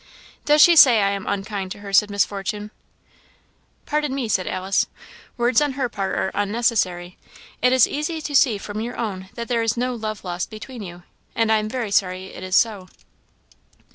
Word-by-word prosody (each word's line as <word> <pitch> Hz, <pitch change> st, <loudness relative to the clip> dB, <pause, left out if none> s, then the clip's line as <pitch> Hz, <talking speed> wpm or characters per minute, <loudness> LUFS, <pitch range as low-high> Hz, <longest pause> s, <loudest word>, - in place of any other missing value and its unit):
"Does 295 Hz, 0 st, +6 dB
she 345 Hz, -, +7 dB
say 255 Hz, -8 st, +8 dB
I 200 Hz, -, +2 dB
am 200 Hz, -1 st, -5 dB
unkind 195 Hz, -1 st, -3 dB
to 205 Hz, -, -14 dB
her?" 200 Hz, -, -8 dB
asked 200 Hz, +2 st, +4 dB
Miss 200 Hz, -2 st, +2 dB
Fortune, 205 Hz, +1 st, -5 dB
fiercely. -, -, -37 dB, 0.6 s
"Pardon 295 Hz, -2 st, -1 dB
me," 265 Hz, -4 st, -2 dB
said 190 Hz, -4 st, 0 dB
Alice, 190 Hz, +1 st, 0 dB, 0.5 s
"words 240 Hz, +2 st, +3 dB
on 290 Hz, -2 st, 0 dB
her 260 Hz, -2 st, -2 dB
part 195 Hz, -4 st, -3 dB
are 190 Hz, -, -1 dB
unnecessary; 205 Hz, -4 st, -1 dB, 0.4 s
it 250 Hz, -, +4 dB
is 260 Hz, -2 st, +5 dB
easy 305 Hz, +3 st, -3 dB
to 295 Hz, -2 st, -5 dB
see 245 Hz, -6 st, +4 dB
from 205 Hz, +1 st, -6 dB
your 240 Hz, +2 st, -5 dB
own 190 Hz, -5 st, -4 dB
that 235 Hz, -1 st, -5 dB
there 235 Hz, -2 st, 0 dB
is 225 Hz, 0 st, 0 dB
no 250 Hz, +1 st, -1 dB
love 215 Hz, -3 st, -5 dB
lost 175 Hz, -1 st, -4 dB
between 225 Hz, +3 st, -9 dB
you, 175 Hz, -2 st, -9 dB, 0.3 s
and 225 Hz, -1 st, +1 dB
I 220 Hz, -, +5 dB
am 215 Hz, 0 st, -4 dB
very 235 Hz, -3 st, -3 dB
sorry 185 Hz, -1 st, 0 dB
it -, -, -9 dB
is 185 Hz, 0 st, -2 dB
so." 205 Hz, -4 st, +2 dB
215 Hz, 200 wpm, -22 LUFS, 195-245 Hz, 0.6 s, say